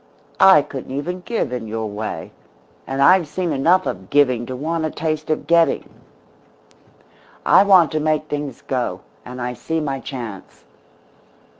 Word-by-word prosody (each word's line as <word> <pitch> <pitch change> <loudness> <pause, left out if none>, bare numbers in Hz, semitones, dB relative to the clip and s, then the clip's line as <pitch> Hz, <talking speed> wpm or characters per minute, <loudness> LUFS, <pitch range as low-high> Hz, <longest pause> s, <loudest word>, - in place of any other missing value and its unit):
I 190 -7 +7
couldn't 135 -1 -7
even 180 +5 -4
give 200 - -3
in 120 -3 -4
your 110 +1 -3
way. 105 +1 -5 0.6
And 135 +1 0
I've 180 +1 +5
seen 175 +2 -3
enough 165 +7 +3
of 95 0 -5
giving 130 -5 +2
to 130 - -5
want 160 +5 -2
a 155 - 0
taste 155 0 -3
of 155 - -1
getting. 170 0 +2 1.6
I - - +6
want 185 -5 +5
to 155 - -1
make 155 0 0
things 145 -4 -5
go 125 -2 -2 0.2
and 125 +1 -9
I 125 0 -3
see 160 +6 -3
my 140 -3 -3
chance. 115 -8 -8
145 Hz, 155 wpm, -20 LUFS, 125-165 Hz, 1.6 s, I